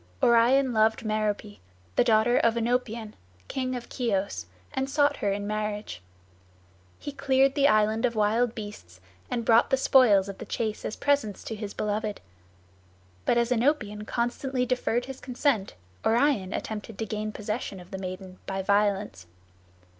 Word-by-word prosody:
Orion 245 +3 +4
loved 220 +1 +2
Merope, 215 -1 -2 0.4
the - - +5
daughter 230 +1 +4
of 230 0 +3
Oenopion, 230 -2 -1 0.3
king 255 -1 -2
of 240 -1 -6
Chios, 195 - -1 0.3
and 265 0 -1
sought 285 +1 +2
her 200 - 0
in 200 +1 -2
marriage. 210 - -3 1.0
He 290 - -6
cleared 270 -1 +2
the 280 0 +4
island 215 0 +3
of 235 -2 -1
wild 220 +3 +2
beasts, 205 - -9 0.3
and 235 -2 -2
brought 230 0 +5
the 265 - +3
spoils 230 -8 +5
of 195 - -7
the - - -6
chase 215 -1 -3
as - - -3
presents 280 -8 0
to 220 - -5
his 210 -1 -6
beloved; 210 0 -2 1.1
but 235 - +3
as 235 +1 +1
Oenopion 225 -5 0
constantly 250 +2 -1
deferred 245 -1 0
his 265 -1 -8
consent, 250 -5 -1 0.3
Orion 230 -5 +2
attempted 215 -1 -5
to 225 - -2
gain 215 0 -3
possession 210 -2 -4
of 180 +1 -14
the 190 - -5
maiden 185 0 -7
by 195 0 -2
violence. 200 - 0
220 Hz, 155 wpm, -27 LUFS, 205-250 Hz, 1.1 s, the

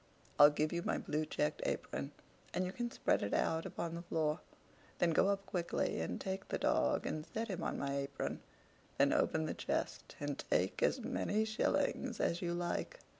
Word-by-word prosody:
I'll 145 - +11
give 150 +2 0
you 170 - 0
my - - 0
blue 155 +1 -1
checked 150 0 0
apron, 70 - -2 0.5
and 185 - +1
you 180 - -2
can 240 +4 -2
spread - - +1
it 100 - 0
out 160 0 +1
upon 170 -1 -4
the 170 - -4
floor; 160 -2 0 0.6
then 170 - +3
go 165 - +4
up 200 0 0
quickly 175 - -1
and 80 +2 -2
take 190 0 -3
the - - -1
dog, 65 - +2
and 155 - -2
set 225 +7 -4
him 185 -2 -3
on - - -1
my 140 0 -1
apron; 140 0 -3 0.6
then - - +5
open 80 - +2
the - - -2
chest, - - -3
and 145 -1 -3
take 90 +2 +1
as 260 - +3
many 220 -3 0
shillings 220 0 0
as 170 - +1
you 175 -1 -1
like. 175 - -2
170 Hz, 190 wpm, -36 LUFS, 145-190 Hz, 0.6 s, I'll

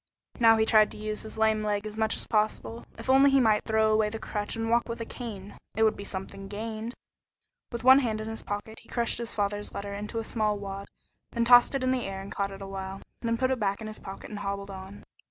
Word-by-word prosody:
Now 225 -1 +7
he 220 - +3
tried 215 -1 +5
to - - -9
use 215 0 -3
his 220 0 -8
lame 220 -1 +3
leg 210 -1 -1
as 215 0 -5
much 220 0 +1
as - - -1
possible. 215 +1 -1
If - - -9
only 270 +2 +6
he 275 0 +5
might 220 -4 +3
throw 220 0 +3
away 215 -1 +3
the 225 - -5
crutch 210 -1 -3
and 225 0 -2
walk 235 +1 +2
with 230 - -4
a 230 - -3
cane, 205 -5 -7 0.2
it 220 - +3
would 220 - +4
be 200 - -7
something 195 0 -6
gained. 220 +3 -5 0.8
With 235 -1 -5
one 260 +2 +9
hand 225 -5 -1
in 215 - -5
his 225 0 -4
pocket 205 +2 -5
he - - -19
crushed 235 -1 0
his 235 -1 -4
father's 205 0 -1
letter 200 0 -4
into 210 +3 -5
a 225 - -1
small 215 -2 0
wad, 200 0 -6 0.5
then 235 -1 +1
tossed 245 +3 +7
it 270 - 0
in 255 - +2
the 255 -1 0
air 195 0 -5
and 195 +1 -8
caught 200 0 -1
it 195 0 -8
awhile, 195 0 -5 0.2
then 230 -1 0
put 255 +2 +1
it 260 - 0
back 200 -2 0
in 220 - -7
his 215 0 -5
pocket 195 +2 -9
and 210 - -5
hobbled 200 0 -4
on. 190 +1 -9
215 Hz, 255 wpm, -28 LUFS, 200-230 Hz, 0.8 s, one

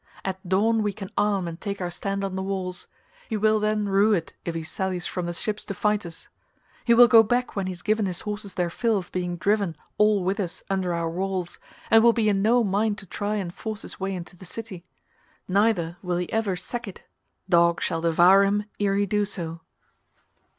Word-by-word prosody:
At 190 -1 -4
dawn 220 +4 +3
we 205 -1 0
can 195 -1 -8
arm 200 -4 +1
and 165 0 -7
take 200 -2 -4
our 175 -1 -3
stand 195 +2 -3
on 195 -1 -3
the 190 - -2
walls; 190 -2 -4 0.4
he 220 - -1
will 215 +1 +3
then 210 0 0
rue 200 +2 +4
it 170 -5 -2
if 170 - -3
he 165 - -3
sallies 185 +2 -3
from 180 -2 -3
the - - -2
ships 210 +4 -3
to 200 - -5
fight 210 -1 0
us. 165 - -11 0.6
He 235 - +5
will 240 +1 +9
go 225 0 +8
back 245 +3 0
when 195 -2 -1
he - - -2
has 175 - -12
given 215 -1 +1
his 180 -1 -3
horses 205 -2 -5
their 175 -3 0
fill 225 +3 +1
of 180 -2 -6
being 180 -1 -2
driven 200 -2 +1 0.2
all 210 -2 +4
whithers 190 -2 -2
under 190 -2 0
our 170 -1 -1
walls, 185 +1 -3 0.3
and 225 - +8
will 235 0 +6
be 225 -2 +2
in 195 -1 +1
no 235 +3 +4
mind 205 +1 +1
to 210 - -9
try 205 +3 -3
and 185 -4 -3
force 220 +1 -6
his - - -9
way 195 0 -2
into 175 0 -8
the 180 - -14
city. 185 -1 -8 0.6
Neither 185 -4 +1
will 180 -2 -1
he 175 0 -4
ever 220 -4 +1
sack 240 +5 -6
it, 195 - -10 0.4
dogs 170 -1 +3
shall 165 - -1
devour 175 +4 +6
him 205 +1 +1 0.2
ere 200 -1 +1
he 205 0 +2
do 210 +1 +1
so." 170 -5 -4
195 Hz, 220 wpm, -25 LUFS, 180-210 Hz, 0.6 s, will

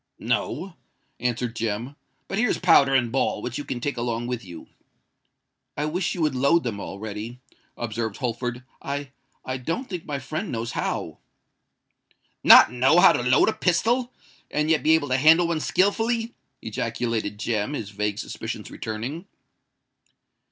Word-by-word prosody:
"No," 165 +7 -2 0.4
answered 120 -1 -2
Jem. 115 +4 -3 0.3
"But 195 - -2
here's 245 0 +2
powder 140 -6 +5
and 120 -3 +2
ball, 135 - 0
which 125 +2 -4
you - - -4
can 125 - -4
take 140 +1 -3
along 120 0 -2
with 120 -1 -4
you." 85 -4 -10 1.1
"I 150 - 0
wish 175 +4 -1
you 170 - -1
would 150 -3 +1
load 140 +6 +3
them 110 -4 -3
all 100 - -6
ready," 110 +3 -6 0.4
observed 110 -2 -3
Holford. 120 0 -3 0.2
"I—I 135 -2 -6
don't 165 - -3
think 180 -4 -6
my 145 -2 -2
friend 155 +9 -4
knows 115 0 -3
how." - - -3 1.2
"Not - - +9
know 130 +7 +4
how - - +8
to - - 0
load 125 +1 +4
a 220 - +2
pistol—and 220 -6 -1
yet 160 - +3
be 160 +1 +5
able 145 -3 -1
to 130 - +2
handle 160 +5 +6
one 165 -2 0
skilfully!" 225 +7 +1 0.3
ejaculated 115 -1 -2
Jem, 110 +3 -1
his 110 -8 -5
vague 105 0 -2
suspicions - - -6
returning. 125 - -5
130 Hz, 150 wpm, -24 LUFS, 115-160 Hz, 1.2 s, Not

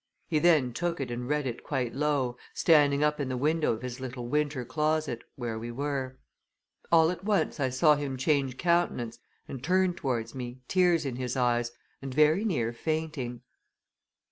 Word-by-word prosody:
He 155 - +1
then 150 -7 +4
took 175 +3 -2
it 130 -3 -3
and 120 +1 -4
read 150 -1 0
it 120 -3 -4
quite 125 -3 -2
low, 140 -3 0 0.2
standing 145 -3 +4
up 150 0 +1
in 140 -2 -2
the 130 - -2
window 155 +4 +1
of 115 +2 -4
his 125 0 -5
little 125 -2 -6
winter 145 -2 0
closet, 150 0 -1
where 120 -3 -4
we 115 +1 -6
were. 130 0 -3 0.7
All 165 0 +6
at 180 0 -7
once 200 -7 0
I 135 -2 +1
saw 150 +4 +4
him 140 -2 -3
change 135 -1 +1
countenance, 170 -10 0 0.3
and 130 -2 -7
turn 185 +1 +2
towards 120 -8 -3
me, 125 -1 -7
tears 175 -4 +3
in 130 -3 -3
his 125 0 -3
eyes, 120 -1 +1 0.3
and 135 -1 -5
very 155 +7 +4
near 120 - 0
fainting. 150 -4 -3
140 Hz, 175 wpm, -29 LUFS, 125-155 Hz, 0.7 s, All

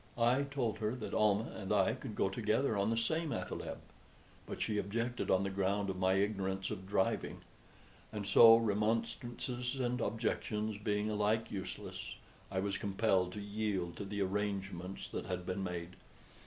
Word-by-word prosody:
I 120 +3 +4
told 135 -6 -1
her 110 +2 0
that 125 - -6
Almah 105 +1 +2
and 95 -2 -5
I 105 +1 +4
could 125 -3 -7
go - - +2
together 110 +4 +1
on 100 +1 +2
the 115 - +1
same 160 +8 +1
athaleb; - - -4 0.7
but - - -5
she 105 -2 0
objected 115 +5 -2
on 95 +1 +4
the 100 - -1
ground 100 +1 0
of 90 - -6
my 95 0 +3
ignorance 95 -1 0
of 95 0 -5
driving. 95 -1 0 0.7
And 105 -2 -4
so, 115 +3 +9
remonstrances 115 +3 -1
and 125 -2 -1
objections 110 -2 -1
being 105 0 0
alike 105 +2 +1
useless, 95 -2 -5 0.3
I 95 -1 -1
was 100 0 -1
compelled 95 -2 +2
to 105 - -5
yield 100 -4 -2
to - - -4
the 100 0 -1
arrangements 95 -2 -3
that - - -4
had 90 -1 -3
been 95 +2 -2
made. 90 -1 -4
105 Hz, 165 wpm, -35 LUFS, 95-115 Hz, 0.7 s, so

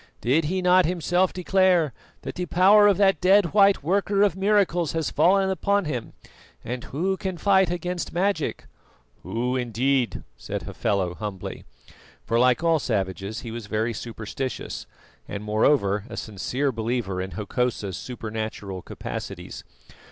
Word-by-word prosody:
Did 145 +7 +2
he 185 +4 -1
not 180 -1 +5
himself 175 +1 +1
declare 180 -5 +2 0.3
that - - -5
the 180 0 -4
power 200 +5 +6
of 200 -3 +4
that 195 -5 +3
dead 190 -1 +4
white 200 -5 +5
worker 200 +4 +2
of 200 -4 +2
miracles 190 -5 +2
has 160 -2 -1
fallen 190 +1 +3
upon 200 +1 +1
him, 125 -7 -4 0.5
and 125 +1 -4
who 185 +7 -1
can 185 -2 -4
fight 190 -1 +3
against 175 0 -3
magic?" 180 -3 -1 0.6
"Who, 125 +3 -2
indeed?" 125 - 0
said - - -5
Hafela 95 -3 -1
humbly; 100 -1 -6 0.6
for 115 0 +1
like 125 +5 +3
all 165 -1 +3
savages 100 -2 -2
he 115 - -7
was 115 -2 -7
very 110 +2 -1
superstitious, 115 +2 -5 0.4
and, 100 - -5
moreover, 105 -2 +2
a - - -7
sincere 125 +7 -2
believer 110 -5 -2
in 95 -1 -6
Hokosa's 105 -1 -2
supernatural 110 -5 -5
capacities. - - -7
140 Hz, 140 wpm, -25 LUFS, 110-185 Hz, 0.6 s, power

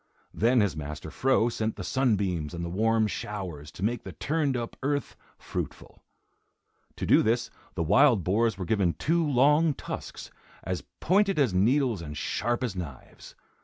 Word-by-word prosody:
Then 120 +2 +3
his 100 -6 0
master 75 +1 -6
Fro 130 -3 +2
sent 110 -2 -2
the - - -6
sunbeams 95 - 0
and 85 0 -4
the 85 - -5
warm 110 +3 +2
showers 95 -9 -5
to 90 - -7
make 115 +2 0
the 95 - -8
turned 145 - 0
up 115 -1 -5
earth 145 +1 -1 0.2
fruitful. - - -6 0.9
To - - -4
do - - +5
this, 115 +2 0 0.2
the 85 - 0
wild 120 - +4
boars 110 +3 +1
were 95 - -4
given 95 -4 +1
two 165 - +1
long 150 +2 +3
tusks, - - -7 0.3
as 90 +1 -3 0.2
pointed 195 +1 +3
as 135 -9 +2
needles 115 +2 +2
and 75 -2 -7
sharp 120 - -1
as 115 -6 -2
knives. 80 -8 -9
110 Hz, 165 wpm, -27 LUFS, 90-130 Hz, 0.9 s, do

